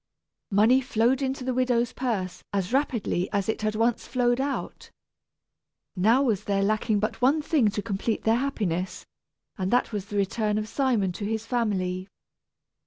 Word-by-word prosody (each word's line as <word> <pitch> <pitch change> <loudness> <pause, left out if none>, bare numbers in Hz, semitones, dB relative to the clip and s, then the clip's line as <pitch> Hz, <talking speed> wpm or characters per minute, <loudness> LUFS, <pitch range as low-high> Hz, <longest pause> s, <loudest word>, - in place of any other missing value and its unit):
Money 220 +6 +4
flowed 250 +1 +1
into 265 -1 -2
the 255 0 -1
widow's 245 -1 +1
purse 195 -8 -3
as 195 +2 -1
rapidly 235 -9 0
as 200 -2 0
it 220 - -1
had 215 0 -1
once 230 +1 0
flowed 245 0 +1
out. 280 0 -4 1.1
Now 225 +8 +4
was 220 -8 0
there 195 -1 +1
lacking 215 +1 +1
but 215 +3 -2
one 275 +5 +4
thing 290 -9 +3
to 205 0 -3
complete 215 +1 -2
their 225 +1 +3
happiness, 190 -9 -2 0.5
and 185 0 -1
that 245 +2 +2
was 205 -2 -4
the 205 - -4
return 210 +2 0
of 215 0 -2
Simon 230 -7 +1
to 200 +4 -5
his 220 +1 -2
family. 190 -6 -1
220 Hz, 165 wpm, -26 LUFS, 200-250 Hz, 1.1 s, Money